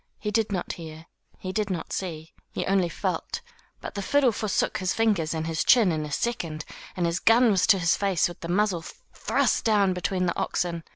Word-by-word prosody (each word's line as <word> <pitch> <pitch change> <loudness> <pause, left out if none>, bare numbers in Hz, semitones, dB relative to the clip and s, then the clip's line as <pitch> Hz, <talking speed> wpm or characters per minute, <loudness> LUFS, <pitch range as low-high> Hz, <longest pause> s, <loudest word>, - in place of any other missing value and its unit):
He 210 -1 -3
did 215 0 +1
not 185 -3 -2
hear, 160 -1 -10 0.3
he 185 - -5
did 210 0 -1
not 180 -3 -4
see, 160 -4 -5 0.2
he - - -2
only 190 -2 +2
felt; 470 - -3 0.4
but - - -7
the 200 - -4
fiddle 270 +4 +3
forsook 215 -1 -1
his 185 0 -1
fingers 205 -8 +1
and 160 0 -2
his 160 -1 -1
chin 225 -7 +5
in 155 -1 -2
a - - -10
second, 165 -5 -2 0.3
and 175 - +1
his 170 +2 0
gun 230 +1 +5
was 190 -2 +2
to 200 - +6
his 170 -2 +2
face 195 -4 +1
with 175 - -10
the 170 - -7
muzzle 185 -2 +1 0.3
thrust - - +1
down 205 -4 +3
between 180 +1 -1
the 170 - -1
oxen. 170 -2 -2
185 Hz, 210 wpm, -26 LUFS, 170-210 Hz, 0.4 s, to